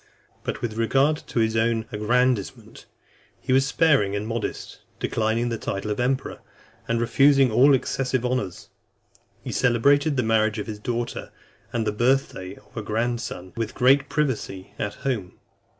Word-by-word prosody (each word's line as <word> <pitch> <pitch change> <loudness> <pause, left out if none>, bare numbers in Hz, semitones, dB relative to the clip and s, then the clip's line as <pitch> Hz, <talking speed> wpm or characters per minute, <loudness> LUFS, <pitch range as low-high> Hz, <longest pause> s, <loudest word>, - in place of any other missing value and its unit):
XII. - - -34
But - - -4
with 110 -2 -3
regard 135 +6 +2
to - - -7
his 110 0 +1
own 115 0 +1
aggrandisement, 120 0 -1 0.5
he 130 - -1
was 135 +1 +4
sparing 135 -10 +3
and 105 +1 -3
modest, 115 0 -4 0.2
declining 115 +2 0
the 115 -2 -3
title 100 +2 -3
of 105 - -3
emperor, 130 +2 -1 0.5
and 115 0 0
refusing 135 +2 +4
all 135 +5 +6
excessive 130 -1 -1
honours. 125 -8 -3 0.7
He - - -5
celebrated 140 +5 +3
the 130 - +2
marriage 110 -1 +2
of 105 - -3
his 105 -2 -6
daughter 120 +1 -3 0.4
and 115 -2 -1
the 105 - +1
birth 130 +6 +1
day 95 +1 -8
of 105 -1 -22
a 110 - -3
grandson 110 -4 -3
with 115 -2 -3
great 135 +2 +4
privacy, 125 -10 -2
at 105 0 -3
home. 110 -10 -2
115 Hz, 160 wpm, -24 LUFS, 110-130 Hz, 0.7 s, all